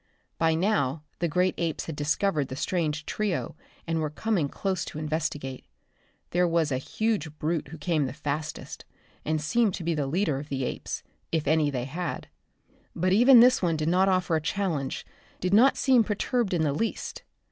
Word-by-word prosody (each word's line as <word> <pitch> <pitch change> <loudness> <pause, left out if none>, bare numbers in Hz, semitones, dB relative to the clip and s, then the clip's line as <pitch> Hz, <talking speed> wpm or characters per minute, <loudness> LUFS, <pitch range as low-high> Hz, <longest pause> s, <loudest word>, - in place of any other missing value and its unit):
By 160 -1 +3
now 165 -6 +1 0.2
the 170 - +1
great 180 +3 +2
apes 165 -2 -1
had 160 - -5
discovered 150 +1 0
the 130 - -6
strange 150 -1 -1
trio 210 -4 -2 0.3
and 165 -1 -1
were 155 -1 -1
coming 170 -2 0
close 190 +1 -2
to - - -8
investigate. 150 -4 -3 0.7
There 175 0 +3
was 165 -3 +1
a 130 - 0
huge 165 -2 -2
brute 155 0 -1
who 160 +4 -9
came 155 -2 0
the - - -5
fastest 150 +3 -5 0.4
and 155 0 0
seemed 210 +6 +1
to - - -6
be 170 +1 0
the 145 -3 -1
leader 155 -2 0
of 145 +1 -9
the 135 -1 -2
apes, - - -4 0.3
if 160 -3 0
any 155 0 +3
they 125 -3 -2
had. 170 +6 -4 0.7
But 185 +2 +1
even 240 +3 +8
this 250 +1 +5
one 170 -3 +1
did 155 +1 0
not 185 +2 +4
offer 185 -3 +2
a 160 - +1
challenge, 160 -6 -2 0.3
did 185 +1 -1
not 245 +6 +6
seem 255 -4 +4
perturbed 215 -1 0
in 160 - +1
the 145 -2 +1
least. 225 +10 -3
165 Hz, 185 wpm, -27 LUFS, 150-190 Hz, 0.7 s, even